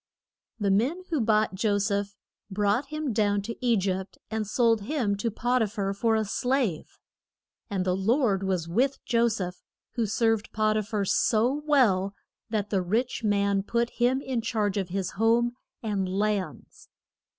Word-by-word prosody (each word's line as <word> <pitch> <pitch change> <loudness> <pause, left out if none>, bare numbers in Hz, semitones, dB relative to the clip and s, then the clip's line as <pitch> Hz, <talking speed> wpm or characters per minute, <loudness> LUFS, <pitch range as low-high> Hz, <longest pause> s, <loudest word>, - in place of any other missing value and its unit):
The 200 -2 +1
men 265 - +1
who 310 -5 +1
bought 215 -2 +2
Jo 205 +2 +1
seph 200 0 -1 0.3
brought 205 +7 +1
him 305 -4 -3
down 205 -1 +1
to 230 +2 -5
E 240 -2 +3
gypt 190 0 -2
and 220 -1 -2
sold 230 0 +2
him 220 -3 -1
to 230 +3 -1
Pot 245 +3 0
i 220 - +2
phar 200 -1 -2
for 225 +3 +1
a 220 0 +1
slave. 245 - -1 0.7
And 190 -3 -1
the 180 -1 +1
Lord 210 0 +2
was 185 -4 -1
with 255 +10 +1
Jo 235 -1 +3
seph, 185 -5 -3 0.3
who 230 -2 -1
served 225 0 +1
Pot 215 0 +2
i 215 - +2
phar 210 -1 -2
so 225 +5 +2
well, 200 -9 +3 0.3
that 210 -2 -2
the 195 -3 +2
rich 230 +7 -1
man 200 -1 +2
put 235 +4 -1
him 250 +2 +1
in 260 -4 -2
charge 215 -3 -1
of 195 -3 -2
his 190 0 -2
home 235 +2 +3 0.3
and 200 -4 -1
lands. 200 0 -3
215 Hz, 170 wpm, -27 LUFS, 200-235 Hz, 0.7 s, E